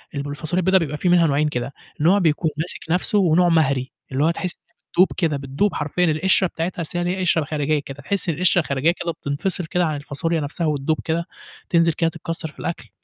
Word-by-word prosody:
الب 140 Hz, 0 st, -3 dB
الفاصوليا 155 Hz, +5 st, -2 dB
البيضا 190 Hz, +2 st, +4 dB
بيبقى 150 Hz, -4 st, -1 dB
فيه 180 Hz, -, 0 dB
منها 175 Hz, -2 st, +5 dB
نوعين 145 Hz, +2 st, +2 dB
كده، 125 Hz, +1 st, -4 dB, 0.3 s
نوع 180 Hz, +6 st, +5 dB
بيكون 160 Hz, -2 st, +1 dB
ماسِك 165 Hz, +3 st, -1 dB
نفْسه 185 Hz, +4 st, +2 dB
ونوع 175 Hz, -1 st, +4 dB
مهري، 140 Hz, -5 st, +2 dB, 0.2 s
اللي 135 Hz, +3 st, +1 dB
هو 165 Hz, -, +4 dB
تحسّ 180 Hz, +1 st, -3 dB
إنّها -, -, -43 dB, 0.2 s
بتدوب 190 Hz, -, +7 dB
كده، 160 Hz, -6 st, +1 dB
بتدوب 140 Hz, +9 st, -1 dB
حرفيًا، 155 Hz, +5 st, 0 dB
القشرة 185 Hz, +4 st, +3 dB
بتاعتها 170 Hz, +1 st, -4 dB
أصل 165 Hz, +2 st, -4 dB
هي -, -, 0 dB
ليها 180 Hz, +2 st, -1 dB
قشرة 170 Hz, -4 st, +2 dB
خارجية 150 Hz, 0 st, 0 dB
كده، 135 Hz, -1 st, -9 dB
تحس 200 Hz, -1 st, -2 dB
إن 155 Hz, -, 0 dB
القشرة 180 Hz, 0 st, +3 dB
الخارجية 140 Hz, +2 st, +1 dB
كده 170 Hz, -1 st, -3 dB
بتنفصل 160 Hz, +5 st, -2 dB
كده 180 Hz, +1 st, 0 dB
عن 155 Hz, -2 st, -1 dB
الفاصوليا 155 Hz, +3 st, -2 dB
نفْسها 155 Hz, +3 st, -2 dB
وتدوب 150 Hz, +1 st, 0 dB
كده، 165 Hz, +1 st, -1 dB, 0.4 s
تنزل 165 Hz, -1 st, +3 dB
كده 165 Hz, 0 st, +1 dB
تتكسّر 165 Hz, -1 st, -5 dB
في -, -, -21 dB
الأكل. 170 Hz, -, -5 dB
165 Hz, 215 wpm, -22 LUFS, 145-175 Hz, 0.4 s, بتدوب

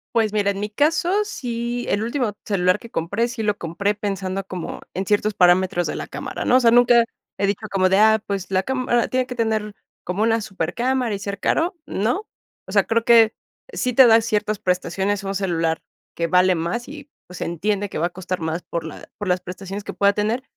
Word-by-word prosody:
Pues 220 Hz, -2 st, +2 dB
mira, 200 Hz, -1 st, +2 dB
en 195 Hz, -, -5 dB
mi 210 Hz, -, -3 dB
caso, 330 Hz, -, +2 dB
sí, 240 Hz, -, -4 dB
el 205 Hz, +2 st, 0 dB
último 235 Hz, -2 st, -1 dB
celular 185 Hz, -1 st, +2 dB
que 235 Hz, -, -12 dB
compré 205 Hz, +9 st, -1 dB
sí 235 Hz, -3 st, -4 dB
lo 210 Hz, -1 st, 0 dB
compré 200 Hz, +5 st, -1 dB
pensando 195 Hz, -2 st, -3 dB
como 185 Hz, -3 st, -6 dB
en 190 Hz, +2 st, -3 dB
ciertos 210 Hz, 0 st, +1 dB
parámetros 180 Hz, -1 st, +3 dB
de -, -, -3 dB
la -, -, -4 dB
cámara, -, -, -6 dB
¿no? 255 Hz, -, +4 dB
O -, -, +5 dB
sea, 235 Hz, -, +5 dB
nunca 240 Hz, -1 st, +6 dB, 0.3 s
he 200 Hz, -, +1 dB
dicho 205 Hz, +2 st, -2 dB
como 185 Hz, -1 st, +3 dB
de 190 Hz, -, +3 dB
ah, 220 Hz, 0 st, +5 dB
pues, 195 Hz, -2 st, -3 dB
¿la 190 Hz, 0 st, +2 dB
cámara 255 Hz, -2 st, 0 dB
tiene 255 Hz, 0 st, 0 dB
que 250 Hz, -, -7 dB
tener 220 Hz, -2 st, -1 dB, 0.3 s
como 185 Hz, +4 st, -1 dB
una 225 Hz, 0 st, +2 dB
supercámara 225 Hz, +6 st, -1 dB
y -, -, -6 dB
ser 200 Hz, 0 st, -5 dB
caro? 345 Hz, -, 0 dB
No. 245 Hz, -, -1 dB, 0.4 s
O -, -, -8 dB
sea, -, -, +5 dB
creo 230 Hz, 0 st, 0 dB
que 230 Hz, -2 st, +6 dB, 0.4 s
sí 250 Hz, -, -1 dB
te 265 Hz, +1 st, +8 dB
da 225 Hz, -1 st, +7 dB
ciertas 215 Hz, -2 st, -1 dB
prestaciones 190 Hz, +2 st, -1 dB
un 195 Hz, 0 st, -3 dB
celular 165 Hz, -4 st, -1 dB, 0.3 s
que 170 Hz, 0 st, -1 dB
vale 180 Hz, +1 st, +4 dB
más 170 Hz, +10 st, -3 dB
y, 290 Hz, 0 st, -10 dB, 0.2 s
pues, 180 Hz, -, -10 dB
se -, -, -3 dB
entiende 205 Hz, +4 st, -1 dB
que -, -, -6 dB
va 165 Hz, +3 st, +1 dB
a -, -, -9 dB
costar 185 Hz, 0 st, -5 dB
más 160 Hz, +2 st, -3 dB
por 170 Hz, -1 st, -4 dB
la 160 Hz, -, -9 dB
por 205 Hz, -3 st, -4 dB
las 180 Hz, 0 st, +2 dB
prestaciones 195 Hz, +3 st, -7 dB
que -, -, -5 dB
pueda 200 Hz, 0 st, +3 dB
tener. 215 Hz, +5 st, -1 dB
205 Hz, 220 wpm, -22 LUFS, 185-235 Hz, 0.4 s, te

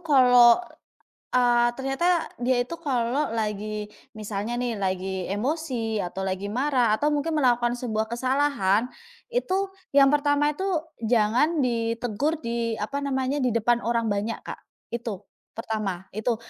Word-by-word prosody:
kalau, 250 Hz, -7 st, +6 dB, 0.8 s
eee, 240 Hz, -1 st, +4 dB
ternyata 330 Hz, +6 st, +1 dB
dia 245 Hz, +1 st, +1 dB
itu 295 Hz, +8 st, -3 dB
kalau 270 Hz, -3 st, -1 dB
lagi 210 Hz, -1 st, -3 dB, 0.2 s
misalnya 215 Hz, +2 st, -4 dB
nih 240 Hz, -3 st, -2 dB
lagi 190 Hz, -1 st, -2 dB
emosi 240 Hz, -1 st, -2 dB
atau 190 Hz, +2 st, -4 dB
lagi 195 Hz, +2 st, -3 dB
marah 250 Hz, -3 st, +2 dB
atau 290 Hz, +7 st, +2 dB
mungkin 295 Hz, +2 st, 0 dB
melakukan 240 Hz, -2 st, +2 dB
sebuah 225 Hz, -3 st, -2 dB
kesalahan, 255 Hz, -5 st, +1 dB, 0.5 s
itu 390 Hz, -5 st, -1 dB, 0.2 s
yang 275 Hz, 0 st, +7 dB
pertama 295 Hz, 0 st, +2 dB
itu 380 Hz, +6 st, -3 dB, 0.3 s
jangan 240 Hz, +7 st, +2 dB
ditegur 235 Hz, +5 st, -1 dB
di 230 Hz, -1 st, -1 dB
apa 280 Hz, +7 st, -3 dB
namanya, 275 Hz, 0 st, -1 dB
di 255 Hz, -, +2 dB
depan 235 Hz, +1 st, +2 dB
orang 230 Hz, -2 st, 0 dB
banyak 210 Hz, +3 st, -3 dB
Kak. -, -, -7 dB, 0.3 s
Itu, 230 Hz, -5 st, -5 dB, 0.3 s
pertama, 210 Hz, -5 st, -3 dB
itu. 220 Hz, +3 st, -1 dB
240 Hz, 130 wpm, -25 LUFS, 215-275 Hz, 0.8 s, yang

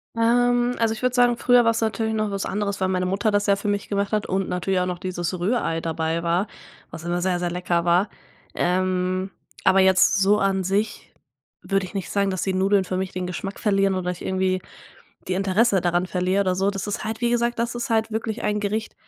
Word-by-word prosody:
Ähm, 245 Hz, +1 st, +2 dB
also, 225 Hz, -1 st, +2 dB
ich 220 Hz, -, -8 dB
würde 250 Hz, -1 st, +1 dB
sagen, 245 Hz, -1 st, +4 dB
früher 245 Hz, -1 st, +4 dB
war 230 Hz, -, +4 dB
es 230 Hz, -, -2 dB
natürlich 220 Hz, 0 st, -1 dB
noch 215 Hz, -1 st, -1 dB
was 195 Hz, -1 st, -2 dB
anderes, 200 Hz, 0 st, -2 dB
weil 190 Hz, -, +2 dB
meine 185 Hz, -1 st, 0 dB
Mutter 200 Hz, +4 st, 0 dB
das 205 Hz, 0 st, +1 dB
ja 200 Hz, -, +4 dB
für 200 Hz, -, -5 dB
mich 205 Hz, 0 st, -1 dB
gemacht 200 Hz, 0 st, -1 dB
hat 210 Hz, -1 st, +1 dB
und 190 Hz, 0 st, -1 dB
natürlich 180 Hz, +1 st, 0 dB
auch 180 Hz, -, +1 dB
noch 180 Hz, -1 st, -4 dB
dieses 180 Hz, -1 st, -3 dB
Rührei 175 Hz, -4 st, 0 dB
dabei 165 Hz, 0 st, -2 dB
war, 175 Hz, +4 st, +1 dB, 0.4 s
was 160 Hz, -, -8 dB
immer 175 Hz, +1 st, -1 dB
sehr, 180 Hz, -1 st, 0 dB
sehr 175 Hz, -1 st, -2 dB
lecker 175 Hz, -1 st, -1 dB
war. 180 Hz, +4 st, +3 dB, 0.5 s
Ähm, 185 Hz, +1 st, 0 dB, 0.3 s
aber 195 Hz, -, +5 dB
jetzt 190 Hz, -1 st, +5 dB
so 205 Hz, +2 st, +4 dB
an 195 Hz, -1 st, +1 dB
sich 200 Hz, +4 st, -2 dB, 0.5 s
würde 195 Hz, -1 st, 0 dB
ich -, -, -11 dB
nicht 195 Hz, -2 st, -4 dB
sagen, 200 Hz, -1 st, +1 dB
dass 185 Hz, -2 st, -2 dB
die 190 Hz, -, -1 dB
Nudeln 190 Hz, +1 st, +2 dB
für 185 Hz, -, -3 dB
mich 190 Hz, 0 st, -3 dB
den 180 Hz, -1 st, -4 dB
Geschmack 195 Hz, +2 st, -5 dB
verlieren 195 Hz, -2 st, +2 dB
oder 180 Hz, -1 st, -1 dB
ich 180 Hz, -, -8 dB
irgendwie 185 Hz, 0 st, 0 dB, 0.7 s
die 185 Hz, -, -1 dB
Interesse 195 Hz, +2 st, +2 dB
daran 175 Hz, +1 st, +1 dB
verliere 185 Hz, +2 st, 0 dB
oder 185 Hz, -2 st, 0 dB
so. 195 Hz, +2 st, +1 dB
Das 200 Hz, 0 st, -5 dB
ist 205 Hz, -, -3 dB
halt 220 Hz, +1 st, -4 dB
wie 240 Hz, -1 st, +1 dB
gesagt, 240 Hz, 0 st, 0 dB
das 235 Hz, +1 st, -1 dB
ist 240 Hz, +2 st, -4 dB
halt 225 Hz, 0 st, +1 dB
wirklich 220 Hz, 0 st, -3 dB
ein 210 Hz, 0 st, 0 dB
Gericht, 215 Hz, +2 st, -3 dB
195 Hz, 230 wpm, -23 LUFS, 185-215 Hz, 0.7 s, aber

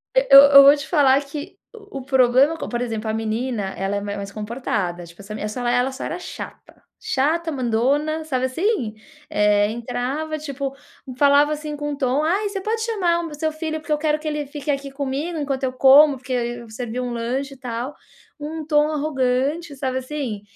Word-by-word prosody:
Eu -, -, +8 dB, 0.2 s
eu -, -, +10 dB
vou 280 Hz, +1 st, +8 dB
te 285 Hz, -2 st, -7 dB
falar 280 Hz, -3 st, +4 dB
que 305 Hz, +7 st, -8 dB, 0.2 s
o 410 Hz, -, -9 dB
problema, 260 Hz, +4 st, +3 dB
como -, -, -6 dB
por 240 Hz, 0 st, -2 dB
exemplo, 225 Hz, -2 st, -3 dB
a -, -, -1 dB
menina 225 Hz, +1 st, -2 dB
ela 195 Hz, +1 st, -2 dB
ela 200 Hz, 0 st, -4 dB
é -, -, -5 dB
mais 200 Hz, 0 st, -6 dB
comportada. 210 Hz, -5 st, -3 dB
Tipo, 170 Hz, +3 st, -14 dB
essa 200 Hz, +2 st, -9 dB
essa 240 Hz, +3 st, -3 dB
ela 245 Hz, +2 st, +1 dB
só 265 Hz, -, -7 dB
era 355 Hz, -, -4 dB
chata. -, -, -10 dB, 0.2 s
Chata, 320 Hz, +5 st, 0 dB
mandona, 280 Hz, +5 st, 0 dB
sabe 260 Hz, -4 st, -1 dB
assim? 260 Hz, -, -1 dB, 0.4 s
Eh, 210 Hz, 0 st, +3 dB
entrava, 250 Hz, +7 st, -3 dB
tipo, 280 Hz, -2 st, -5 dB, 0.4 s
falava, 285 Hz, +2 st, +4 dB
assim, 300 Hz, 0 st, -5 dB
com 295 Hz, 0 st, -3 dB
um -, -, -3 dB
tom: 275 Hz, +1 st, 0 dB
"Ai 390 Hz, +6 st, 0 dB
você 400 Hz, -1 st, -4 dB
pode 440 Hz, +3 st, -2 dB
chamar 370 Hz, -7 st, +1 dB
o 340 Hz, -, -4 dB
meu 300 Hz, -, -8 dB
seu 315 Hz, +1 st, -1 dB
filho 315 Hz, 0 st, -4 dB
porque 305 Hz, 0 st, -2 dB
eu -, -, +1 dB
quero 305 Hz, 0 st, 0 dB
que 310 Hz, -, -7 dB
ele 300 Hz, -1 st, -2 dB
fique 290 Hz, +1 st, -7 dB
aqui 275 Hz, -1 st, -2 dB
comigo 280 Hz, +5 st, -3 dB
enquanto 275 Hz, -3 st, -3 dB
eu 260 Hz, -, 0 dB
como, 275 Hz, +2 st, +6 dB
porque 255 Hz, 0 st, -6 dB
eu 240 Hz, -1 st, -3 dB
servi 235 Hz, +2 st, -5 dB
um 250 Hz, -1 st, -3 dB
lanche 255 Hz, +4 st, -3 dB
e -, -, -15 dB
tal". 250 Hz, +2 st, -5 dB, 0.4 s
Um 310 Hz, +1 st, -6 dB
tom 300 Hz, -1 st, +3 dB
arrogante, 285 Hz, +1 st, -1 dB
sabe, 260 Hz, -1 st, -2 dB
assim? 255 Hz, -6 st, -5 dB
275 Hz, 200 wpm, -22 LUFS, 245-305 Hz, 0.4 s, eu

